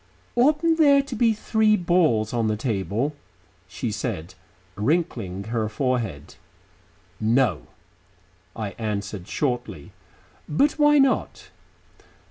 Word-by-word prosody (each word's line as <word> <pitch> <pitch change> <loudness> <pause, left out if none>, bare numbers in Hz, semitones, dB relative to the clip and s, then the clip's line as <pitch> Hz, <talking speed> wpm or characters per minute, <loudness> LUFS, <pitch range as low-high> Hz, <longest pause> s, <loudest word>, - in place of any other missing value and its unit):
"Oughtn't 305 +6 +3
there 280 -3 +6
to 275 -3 -7
be 230 0 +3
three 215 0 +2
balls 165 - +2
on 115 -2 0
the 110 - 0
table?" 110 +4 -2 0.5
she 110 +4 -4
said, 100 -5 -4 0.4
wrinkling 110 - -1
her 110 -2 -1
forehead. 110 - -3 0.8
"No," 110 - +1 0.9
I 105 -3 -4
answered 100 -4 -4
shortly. 125 -6 -3 0.6
"But 280 - +3
why 295 0 +5
not?" 270 -2 +1
120 Hz, 100 wpm, -24 LUFS, -, 0.9 s, there